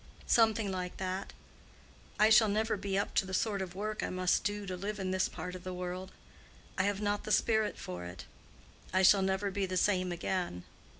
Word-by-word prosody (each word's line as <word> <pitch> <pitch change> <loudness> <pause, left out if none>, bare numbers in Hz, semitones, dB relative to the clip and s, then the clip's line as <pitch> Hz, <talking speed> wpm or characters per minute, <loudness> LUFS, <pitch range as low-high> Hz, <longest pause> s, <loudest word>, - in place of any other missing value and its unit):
"Something 220 -3 +3
like 180 -1 -4
that. 185 0 -3 0.9
I 215 +1 +6
shall 220 -1 +7
never 220 +2 +1
be 195 -1 -2
up 200 - -1
to - - +3
the 190 - -2
sort 205 -1 0
of 185 -1 -5
work 215 +2 -3
I - - -2
must 185 0 +1
do 205 0 -2
to 185 -1 -4
live 200 +3 -4
in 185 -1 -2
this 185 0 +1
part 180 - -6
of 185 -1 -8
the 185 -1 -5
world. 180 +1 -5 0.6
I 185 - +1
have 205 0 0
not 205 0 0
the 215 - -4
spirit 220 +1 +2
for 90 -1 -6
it. 90 -1 -8 0.7
I 185 +1 +3
shall 195 +1 +7
never 190 +1 0
be 195 0 -1
the 185 0 -2
same 185 -1 +2
again. 175 - -2
190 Hz, 205 wpm, -32 LUFS, 185-205 Hz, 0.9 s, shall